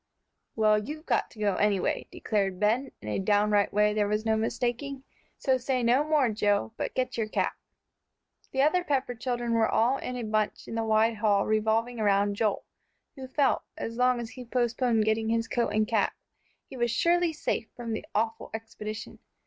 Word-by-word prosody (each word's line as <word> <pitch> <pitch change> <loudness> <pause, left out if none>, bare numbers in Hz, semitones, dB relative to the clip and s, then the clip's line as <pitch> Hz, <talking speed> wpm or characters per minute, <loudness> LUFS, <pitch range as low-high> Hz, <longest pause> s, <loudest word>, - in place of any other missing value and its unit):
"Well, 215 -1 +4
you've 305 +9 -7
got - - +1
to 220 - -16
go 205 -3 +1
anyway," 205 -2 +1
declared 195 -4 -1
Ben, 235 +6 +1
in - - -8
a 105 - -1
downright 205 +1 +2
way 210 +1 +3
there 210 -1 +1
was 210 +1 -1
no 220 0 +2
mistaking. 245 +4 -2 0.3
"So 260 -1 +1
say 255 0 -1
no 245 +5 +4
more, 300 -5 +2
Joe, 205 - 0
but - - -4
get 255 -1 -1
your 220 - 0
cap." - - 0 1.0
The 265 0 +2
other 350 +5 +3
Pepper 270 -6 0
children 240 0 -2
were 225 -1 +3
all 245 +4 +2
in 250 - -5
a 245 - -4
bunch 215 -1 -1
in - - -6
the 225 0 -1
wide 220 +1 +2
hall 205 -2 +2
revolving 220 +2 +1
around 205 -1 +2
Joel, 210 -1 0 0.5
who 265 -2 -8
felt, 275 +2 +2 0.2
as 230 - -4
long 250 0 +3
as 235 -1 -6
he 255 - -9
postponed 240 -2 +1
getting 220 0 +1
his 230 0 0
coat 240 -1 0
and 215 0 +1
cap, 220 -2 +1 0.5
he - - -11
was 240 -1 0
surely 340 +8 +2
safe 310 - -2
from 235 -2 -5
making 220 - -4
the - - +1
awful 225 0 -4
expedition. 220 -1 -7
225 Hz, 190 wpm, -28 LUFS, 215-250 Hz, 1.0 s, Well